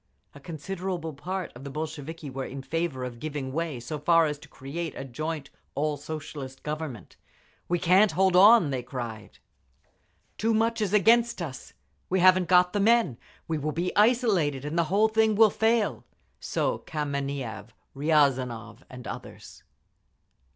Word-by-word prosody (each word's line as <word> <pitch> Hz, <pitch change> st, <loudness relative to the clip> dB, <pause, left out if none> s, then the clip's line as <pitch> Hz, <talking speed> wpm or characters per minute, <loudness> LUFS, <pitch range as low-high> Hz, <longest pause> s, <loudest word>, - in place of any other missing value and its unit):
A 140 Hz, -, -12 dB
considerable 170 Hz, +2 st, -5 dB
part 185 Hz, +6 st, -5 dB
of 120 Hz, -, -11 dB
the 140 Hz, -, -6 dB
Bolsheviki 155 Hz, +1 st, -6 dB
were 135 Hz, 0 st, -5 dB
in 135 Hz, +1 st, -7 dB
favour 165 Hz, -4 st, -2 dB
of 120 Hz, -2 st, -6 dB
giving 145 Hz, -3 st, -4 dB
way 160 Hz, -4 st, -2 dB
so 150 Hz, +6 st, -5 dB
far 165 Hz, +2 st, +4 dB
as 150 Hz, -1 st, -3 dB
to -, -, -14 dB
create 155 Hz, +5 st, -6 dB
a -, -, -6 dB
joint 155 Hz, +2 st, -5 dB, 0.2 s
all 150 Hz, +1 st, 0 dB
Socialist 145 Hz, -2 st, -7 dB
government. 150 Hz, -, -6 dB, 0.5 s
"We 175 Hz, -, +1 dB
can't 185 Hz, +3 st, +4 dB
hold 190 Hz, +2 st, +3 dB
on!" 200 Hz, -4 st, +7 dB
they 130 Hz, -2 st, -2 dB
cried. 120 Hz, -4 st, -7 dB, 1.0 s
"Too 225 Hz, +1 st, +2 dB
much 230 Hz, +1 st, +1 dB
is 205 Hz, -3 st, 0 dB
against 230 Hz, +3 st, +4 dB
us. 145 Hz, -7 st, -7 dB, 0.4 s
We 190 Hz, -, +1 dB
haven't 185 Hz, 0 st, +5 dB
got 180 Hz, 0 st, +5 dB
the 205 Hz, -, 0 dB
men. 220 Hz, -, +3 dB, 0.3 s
We 160 Hz, -1 st, -1 dB
will 150 Hz, +1 st, -2 dB
be 175 Hz, +4 st, -2 dB
isolated, 205 Hz, -, +2 dB
and 150 Hz, +2 st, -4 dB
the 170 Hz, -1 st, +2 dB
whole 205 Hz, +6 st, +3 dB
thing 220 Hz, -1 st, +2 dB
will 220 Hz, -1 st, +6 dB
fall." 225 Hz, -1 st, +1 dB, 0.4 s
So -, -, -1 dB
Kameniev, 140 Hz, -7 st, -4 dB, 0.3 s
Riazanov 135 Hz, -6 st, +1 dB
and 125 Hz, -2 st, -10 dB
others. -, -, -9 dB
160 Hz, 155 wpm, -27 LUFS, 140-190 Hz, 1.0 s, on